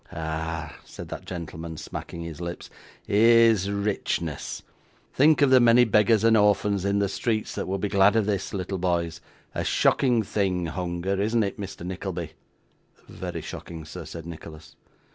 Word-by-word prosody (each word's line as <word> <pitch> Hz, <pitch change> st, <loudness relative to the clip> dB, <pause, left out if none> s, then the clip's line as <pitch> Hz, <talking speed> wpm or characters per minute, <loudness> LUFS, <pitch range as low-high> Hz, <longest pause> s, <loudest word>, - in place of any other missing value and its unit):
'Ah!' 80 Hz, 0 st, -4 dB
said -, -, -10 dB
that -, -, -7 dB
gentleman, 80 Hz, -2 st, -6 dB
smacking 85 Hz, +2 st, -7 dB
his 85 Hz, 0 st, -7 dB
lips, 85 Hz, 0 st, -6 dB, 0.3 s
'here's 115 Hz, -2 st, +5 dB
richness! 100 Hz, 0 st, -2 dB, 0.5 s
Think 150 Hz, +1 st, +5 dB
of 135 Hz, -, +4 dB
the 130 Hz, -, +8 dB
many 120 Hz, 0 st, +6 dB
beggars 110 Hz, 0 st, +3 dB
and 115 Hz, 0 st, +5 dB
orphans 105 Hz, -2 st, +2 dB
in 100 Hz, 0 st, +1 dB
the 100 Hz, 0 st, +2 dB
streets 110 Hz, +3 st, -2 dB
that -, -, -4 dB
would 95 Hz, 0 st, -2 dB
be 105 Hz, -, 0 dB
glad 100 Hz, +1 st, +4 dB
of 110 Hz, -2 st, +3 dB
this, 100 Hz, -2 st, -2 dB
little 95 Hz, 0 st, -3 dB
boys. 85 Hz, -2 st, -1 dB, 0.3 s
A -, -, -2 dB
shocking 120 Hz, -4 st, +2 dB
thing 95 Hz, -3 st, -1 dB
hunger, 90 Hz, +3 st, -2 dB
isn't 110 Hz, +2 st, +2 dB
it, 100 Hz, 0 st, -4 dB
Mr. 95 Hz, -3 st, -7 dB
Nickleby?' 90 Hz, -2 st, -5 dB, 0.8 s
'Very -, -, -6 dB
shocking, 80 Hz, -2 st, -8 dB
sir,' 75 Hz, -, -8 dB
said 85 Hz, -1 st, -8 dB
Nicholas. 80 Hz, -2 st, -10 dB
95 Hz, 160 wpm, -25 LUFS, 85-105 Hz, 0.8 s, the